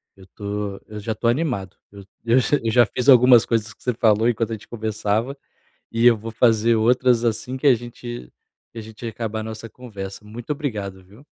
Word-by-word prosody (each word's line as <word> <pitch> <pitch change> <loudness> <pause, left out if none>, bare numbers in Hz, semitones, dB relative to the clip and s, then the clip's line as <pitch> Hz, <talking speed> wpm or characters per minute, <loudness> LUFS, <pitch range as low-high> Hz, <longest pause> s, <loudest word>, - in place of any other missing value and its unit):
Eu 95 -1 -17
tô 100 0 -5
eu 105 -1 -8
já 110 +1 -3
tô 115 - -2
animado. 120 - -1 0.2
Eu 100 0 -12 0.2
eu 120 +2 +4 0.3
já 120 0 +5
fiz 125 +6 -1
algumas 125 -2 +7
coisas 110 -2 -1
que - - -33
você 125 - -1
falou 110 +1 +3
enquanto 115 -1 -1
a - - -1
gente 110 - -9
conversava, 110 +3 -2 0.6
e 115 +1 +1
eu 120 -2 +6
vou 115 +1 -7
fazer 115 0 +3
outras 120 +1 +3
assim 120 +3 -2
que 145 - 0
a 130 - +7
gente 120 - -9 0.4
que 115 - -8
a - - -6
gente 110 +2 -11
acabar 110 -1 -4
a - - -6
nossa 110 0 -8
conversa. 105 -5 -9
Muito 115 +5 -10
obrigado, 105 -11 -4
viu? 105 +10 -19
115 Hz, 200 wpm, -22 LUFS, 105-120 Hz, 0.6 s, algumas